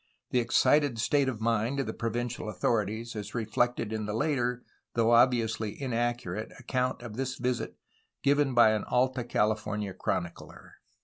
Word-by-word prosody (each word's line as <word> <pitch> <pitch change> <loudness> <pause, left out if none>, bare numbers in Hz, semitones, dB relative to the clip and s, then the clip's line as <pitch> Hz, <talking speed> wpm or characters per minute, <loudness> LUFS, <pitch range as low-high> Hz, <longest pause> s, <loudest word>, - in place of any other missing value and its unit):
The 125 - +3
excited 120 +2 +3
state 135 +4 +2
of 115 -4 -5
mind 115 +4 +1
of 135 - 0
the 110 - -4
provincial 120 0 -3
authorities 110 +3 -1
is 105 +1 -6
reflected 115 0 0
in 110 -1 -3
the 105 - -2
later, 125 -2 0 0.3
though 115 0 +3
ob 120 +2 +7
viously 110 -3 -2
inaccurate, 120 -6 -2
account 125 -1 -2
of 115 -2 -8
this 130 0 -2
visit 125 -1 -2 0.5
given 140 -2 +3
by 120 -2 +7
an 110 -1 0
Alta 130 0 +1
California 105 -3 -1
chronicler. 85 -2 -4
120 Hz, 150 wpm, -29 LUFS, 110-125 Hz, 0.5 s, ob